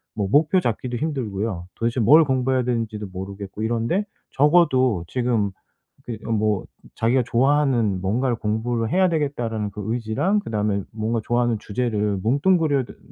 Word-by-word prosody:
뭐 100 Hz, -3 st, -1 dB
목표 155 Hz, -, +4 dB
잡기도 120 Hz, -3 st, -2 dB
힘들고요. 110 Hz, -, -3 dB
도대체 115 Hz, +2 st, -1 dB
뭘 150 Hz, +9 st, +7 dB
공부해야 130 Hz, -1 st, +1 dB
되는지도 115 Hz, -4 st, -2 dB
모르겠고 100 Hz, +2 st, -7 dB
이런데 120 Hz, -, 0 dB, 0.3 s
적어도 130 Hz, -, +3 dB
지금 120 Hz, -3 st, 0 dB, 0.5 s
그 115 Hz, -3 st, -6 dB
어 -, -, -2 dB
뭐 105 Hz, -2 st, 0 dB, 0.3 s
자기가 120 Hz, +3 st, +2 dB
'좋아하는 125 Hz, -6 st, +2 dB
뭔가를 120 Hz, +6 st, 0 dB
공부를 115 Hz, +1 st, -1 dB
해야 185 Hz, -1 st, +3 dB
되겠다.'라는 120 Hz, -9 st, -2 dB
그 105 Hz, -, -7 dB
의지랑 120 Hz, -, 0 dB
그다음에 105 Hz, -, -1 dB
뭔가 110 Hz, +1 st, -2 dB
좋아하는 120 Hz, -1 st, +1 dB
주제를 105 Hz, -3 st, -1 dB
뭉뚱그려더 140 Hz, -, +1 dB
더 -, -, -25 dB
115 Hz, 365 characters per minute, -23 LUFS, 105-135 Hz, 0.5 s, 뭘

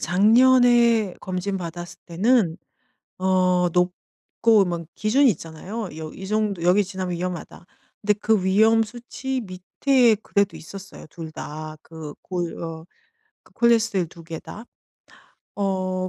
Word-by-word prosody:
작년에 235 Hz, -, +4 dB
검진 185 Hz, +1 st, -3 dB
받았을 175 Hz, -1 st, -7 dB
때는 190 Hz, 0 st, +2 dB, 0.6 s
어 185 Hz, -1 st, +2 dB
높고 185 Hz, +4 st, +1 dB
뭔 170 Hz, -2 st, -4 dB
기준이 250 Hz, +5 st, +3 dB
있잖아요. 185 Hz, +6 st, -6 dB
여 155 Hz, -1 st, -7 dB
이 190 Hz, -, -9 dB
정도 210 Hz, -4 st, -1 dB
여기 185 Hz, +4 st, +4 dB
지나면 185 Hz, -1 st, -4 dB
위험하다. 180 Hz, -1 st, -6 dB, 0.4 s
근데 210 Hz, -, +3 dB
그 210 Hz, -1 st, +1 dB
위험 220 Hz, +4 st, +4 dB
수치 245 Hz, +3 st, -5 dB
밑에 220 Hz, +5 st, +2 dB
그래도 200 Hz, -1 st, 0 dB
있었어요 195 Hz, +3 st, -11 dB
2 160 Hz, 0 st, -8 dB
다 155 Hz, 0 st, -7 dB
그 160 Hz, -3 st, -9 dB
골 175 Hz, -2 st, -4 dB
어 165 Hz, -1 st, -6 dB, 0.6 s
그 -, -, -24 dB
콜레스테롤 225 Hz, -6 st, +2 dB
2 165 Hz, +1 st, -14 dB
개 160 Hz, 0 st, -7 dB
다. 220 Hz, -, -10 dB, 0.9 s
어 185 Hz, -2 st, -1 dB
190 Hz, 235 characters per minute, -23 LUFS, 175-220 Hz, 0.9 s, 작년에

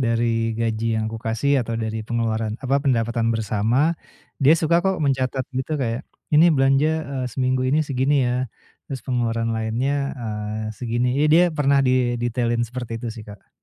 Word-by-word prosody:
dari 115 Hz, -2 st, 0 dB
gaji 115 Hz, 0 st, -1 dB
yang 110 Hz, -, -1 dB
aku 115 Hz, -, -6 dB
kasih 125 Hz, +5 st, +1 dB
atau 115 Hz, -1 st, -3 dB
dari 110 Hz, -1 st, -3 dB
pengeluaran 110 Hz, -1 st, -2 dB
apa 135 Hz, +2 st, +2 dB
pendapatan 115 Hz, -4 st, +1 dB
bersama, 115 Hz, +6 st, +1 dB, 0.5 s
dia 140 Hz, +3 st, +6 dB
suka 170 Hz, +2 st, +2 dB
kok 190 Hz, +1 st, 0 dB
mencatat 135 Hz, -2 st, 0 dB
gitu 130 Hz, +4 st, -2 dB
kayak, 120 Hz, -3 st, -2 dB, 0.3 s
"Ini 155 Hz, +3 st, +7 dB
belanja, 135 Hz, -1 st, +3 dB, 0.2 s
eee, 130 Hz, -2 st, -2 dB
seminggu 130 Hz, +1 st, 0 dB
ini 155 Hz, +3 st, +2 dB
segini 135 Hz, 0 st, +1 dB
ya" 125 Hz, +1 st, -1 dB, 0.4 s
terus 135 Hz, -3 st, -6 dB
pengeluaran 115 Hz, -3 st, -1 dB
lainnya, 130 Hz, +6 st, -1 dB
eee, 110 Hz, -2 st, -4 dB
segini 120 Hz, +2 st, -1 dB
ya 150 Hz, -, +4 dB
dia 165 Hz, +3 st, +6 dB
pernah 140 Hz, -2 st, +2 dB
didetailin 120 Hz, -2 st, +1 dB
seperti 120 Hz, -1 st, -6 dB
itu 115 Hz, -1 st, -5 dB
sih, 115 Hz, -, -9 dB
Kak. 105 Hz, -1 st, -13 dB
120 Hz, 165 wpm, -22 LUFS, 115-135 Hz, 0.5 s, Ini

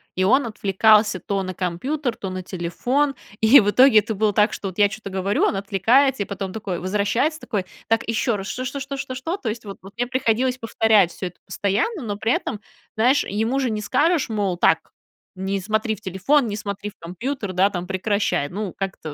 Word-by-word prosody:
и 185 Hz, -, +1 dB
он 255 Hz, +6 st, +3 dB
отвлекался 210 Hz, -1 st, +3 dB
то 195 Hz, +3 st, -2 dB
на 185 Hz, 0 st, -5 dB
компьютер, 235 Hz, -, -2 dB
то 190 Hz, -2 st, -6 dB
на 185 Hz, -, -4 dB
телефон. 225 Hz, +11 st, -1 dB, 0.3 s
И 225 Hz, +6 st, +8 dB
в 205 Hz, -, +2 dB
итоге 250 Hz, 0 st, +6 dB
это 220 Hz, +1 st, -3 dB
было 210 Hz, 0 st, +1 dB
так, 210 Hz, +2 st, +3 dB
что 195 Hz, -2 st, -5 dB
я 205 Hz, +1 st, +5 dB
вот 200 Hz, -, 0 dB
чё-то 215 Hz, -1 st, -7 dB
говорю, 190 Hz, +2 st, 0 dB
он -, -, +2 dB
отвлекается 220 Hz, +6 st, +2 dB
и -, -, -9 dB
потом 195 Hz, -1 st, -5 dB
такой 195 Hz, -5 st, -4 dB
возвращается, 210 Hz, -, 0 dB
такой: 205 Hz, -10 st, -3 dB, 0.2 s
"Так 225 Hz, 0 st, +1 dB
еще 230 Hz, 0 st, 0 dB
раз, 195 Hz, -1 st, -5 dB
что 255 Hz, +3 st, -4 dB
что 275 Hz, +3 st, -4 dB
что 275 Hz, +1 st, -5 dB
что 265 Hz, -1 st, -5 dB
что?" 325 Hz, +9 st, -3 dB
То 235 Hz, -, -4 dB
есть, 225 Hz, +1 st, -5 dB
вот 195 Hz, -, -8 dB
вот 195 Hz, +1 st, -12 dB
мне 245 Hz, +1 st, -1 dB
приходилось 255 Hz, 0 st, 0 dB
повторять 220 Hz, -5 st, +3 dB
всё 185 Hz, -, -5 dB
это 180 Hz, -, -12 dB
постоянно, 220 Hz, -, -1 dB
но 205 Hz, -3 st, -4 dB
при 225 Hz, +2 st, 0 dB
этом, 210 Hz, -, -1 dB, 0.4 s
знаешь, 255 Hz, +6 st, +3 dB
ему 225 Hz, +7 st, -1 dB
же 260 Hz, -, 0 dB
не 215 Hz, -1 st, -2 dB
скажешь, 310 Hz, +8 st, +2 dB
мол: 200 Hz, -5 st, -1 dB
"Так, -, -, +2 dB, 0.4 s
не 190 Hz, +1 st, -2 dB
смотри 215 Hz, +2 st, -1 dB
в 210 Hz, -, -18 dB
телефон, 215 Hz, +9 st, +1 dB
не 205 Hz, -, -3 dB
смотри 205 Hz, -1 st, -5 dB
в 210 Hz, -, -18 dB
компьютер, 200 Hz, +5 st, -4 dB
да, 190 Hz, +2 st, +3 dB
там 180 Hz, -2 st, -4 dB
прекращай". 190 Hz, -5 st, -1 dB
Ну, 200 Hz, 0 st, -4 dB
как-то, 190 Hz, -6 st, -5 dB
210 Hz, 215 wpm, -22 LUFS, 195-245 Hz, 0.4 s, И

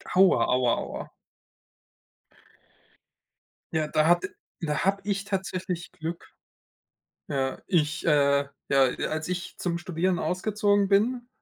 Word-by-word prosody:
Aua, 185 Hz, -10 st, +6 dB
aua, 125 Hz, -1 st, +2 dB
aua. -, -, -5 dB, 2.6 s
Ja, 155 Hz, -1 st, +1 dB
da 155 Hz, 0 st, +2 dB
hat 175 Hz, -, +3 dB, 0.3 s
da 150 Hz, -4 st, -1 dB
habe 195 Hz, +1 st, +1 dB
ich 200 Hz, 0 st, -1 dB
tatsächlich 185 Hz, -2 st, -3 dB
Glück. 165 Hz, +2 st, -6 dB, 1.0 s
Ja, 135 Hz, -1 st, -1 dB
ich 155 Hz, -5 st, +1 dB
äh, 140 Hz, -2 st, +3 dB, 0.2 s
ja, 135 Hz, 0 st, +4 dB, 0.3 s
als 155 Hz, +1 st, -3 dB
ich 180 Hz, 0 st, -4 dB
zum 170 Hz, -2 st, -1 dB
Studieren 175 Hz, +1 st, -1 dB
ausgezogen 205 Hz, +2 st, +1 dB
bin, 240 Hz, +5 st, +2 dB
175 Hz, 110 wpm, -27 LUFS, 150-195 Hz, 2.6 s, Aua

